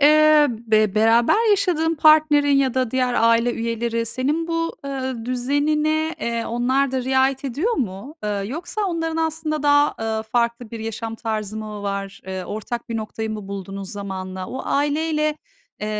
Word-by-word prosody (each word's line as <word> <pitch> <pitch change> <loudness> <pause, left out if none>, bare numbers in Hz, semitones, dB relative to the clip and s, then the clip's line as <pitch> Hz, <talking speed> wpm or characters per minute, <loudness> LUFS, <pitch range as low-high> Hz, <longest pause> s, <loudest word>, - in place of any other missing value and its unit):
eee, 305 0 +6
be 215 -3 +1
beraber 235 - +4
yaşadığın 355 -5 +2
partnerin 305 -2 +5
ya 265 -2 +2
da 255 -3 0
diğer 255 -1 +1
aile 230 +1 +3
üyeleri 230 0 -2
senin 290 +8 -1
bu, 330 0 -1
ııı, 260 -4 -4
düzenine, 300 +5 0
eee, 235 -1 -2
onlar 255 +3 +1
da 260 -1 -1
riayet 265 +1 +2
ediyor 295 - -1
mu? 230 - -4
Eee, - - -1 0.2
yoksa 335 - -5
onların 325 -2 -2
aslında 315 -2 -1
daha, 290 0 +4
ııı, 220 0 -1
farklı 235 0 -1
bir 230 -1 -6
yaşam 225 0 -4
tarzı 215 -2 -4
mı 210 -1 -6
var? 195 -1 -4
Eee, 190 -1 -4
ortak 230 +5 -5
bir 230 - -2
noktayı 220 0 -4
mı 210 -2 -6
buldunuz 195 0 -6
zamanla? 190 -2 -5
O 260 - -5
aileyle, 305 +1 0 0.4
eee, 210 - -3
250 Hz, 160 wpm, -22 LUFS, 220-300 Hz, 0.4 s, eee